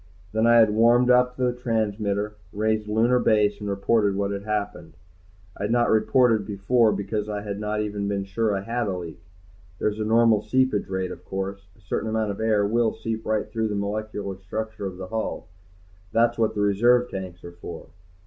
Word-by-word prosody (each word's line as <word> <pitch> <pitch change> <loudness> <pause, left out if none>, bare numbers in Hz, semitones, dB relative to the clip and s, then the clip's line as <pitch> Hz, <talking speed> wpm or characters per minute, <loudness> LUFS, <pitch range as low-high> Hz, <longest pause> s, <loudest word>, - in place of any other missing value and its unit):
Then 110 +2 +2
I 120 - +6
had 110 -2 +6
warmed 120 +3 +4
up 125 0 +3
the 125 -1 +1
transmitter, 105 -3 -1 0.2
raised 110 0 -1
Lunar 115 +4 +3
Base, 105 -3 +2
and 105 - -3
reported 100 +1 +1
what 100 0 -1
had 100 0 -5
happened. 105 -5 -4 0.6
I 100 - -3
had 105 - -2
not 120 0 +3
reported 110 0 +3
before 105 +3 +2
because 105 +1 -3
I 105 -1 -3
had 100 -1 -5
not 105 0 -2
even 105 -1 -3
been 100 -1 -1
sure 100 +2 -1
I 95 - -2
had 115 +2 -2
a 95 -2 -2
leak. 85 -1 -8 0.6
There's 105 +2 -1
a - - 0
normal 115 0 +4
seepage 130 -1 +1
rate, 95 -1 -3
of - - -9
course; 95 0 -5
a - - -24
certain 100 +3 -3
amount 110 -1 0
of 100 - -7
air 110 -2 +2
will 115 +1 +1
seep 110 0 -4
right 110 -1 0
through 110 -1 -2
the 105 - -3
molecular 100 -1 -4
structure 110 +2 -5
of 90 -1 -8
the 95 0 -7
hull. 110 -6 -4 0.6
That's 115 +1 +3
what 115 -2 0
the 105 - -1
reserve 120 +5 +3
tanks 90 -2 -7
are 85 - -8
for. 85 0 -9
105 Hz, 195 wpm, -24 LUFS, 100-115 Hz, 0.6 s, I